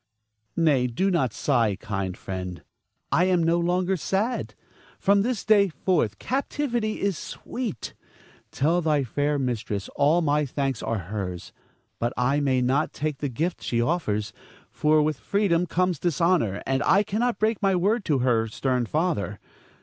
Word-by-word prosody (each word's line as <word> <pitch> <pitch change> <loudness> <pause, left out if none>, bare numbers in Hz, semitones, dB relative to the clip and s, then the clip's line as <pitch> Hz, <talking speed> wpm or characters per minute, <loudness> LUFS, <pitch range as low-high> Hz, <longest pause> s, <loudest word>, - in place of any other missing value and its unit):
Nay, 145 -6 +3
do 185 +12 0
not 135 - +1
sigh, 115 -5 +1
kind 95 -3 -3
friend; 90 -2 -6 0.5
I 180 - +4
am 180 -2 +2
no 165 +1 +2
longer 180 +2 +1
sad. 200 - -1 0.4
From 200 0 +3
this 240 +1 -2
day 205 -2 +5
forth 155 - 0
captivity 245 -5 -2
is 195 -5 -1
sweet. 235 - -5 0.6
Tell 165 +5 +1
thy 150 -3 +2
fair 145 +4 0
mistress 115 -6 -2
all 160 +5 +3
my 150 0 +2
thanks 135 -3 -2
are 115 - -1 0.2
hers; 90 -4 -5 0.5
but 120 +1 -1
I 130 +4 +2
may 130 -3 +1
not 135 +5 +1
take 150 -2 -3
the 145 - -2
gift 165 +8 -2
she 120 - -1
offers, 115 -7 -1 0.4
for 150 0 +3
with 150 -3 -1
freedom 180 -4 +1
comes 180 -2 0
dishonor, 165 - +1
and 135 0 0
I 200 - +4
cannot 230 +4 -1
break 215 0 0
my 195 -2 +3
word 205 +5 +1
to 150 - +2
her 115 -3 +2
stern 125 +1 -1
father. 150 - -1
150 Hz, 155 wpm, -25 LUFS, 125-185 Hz, 0.6 s, day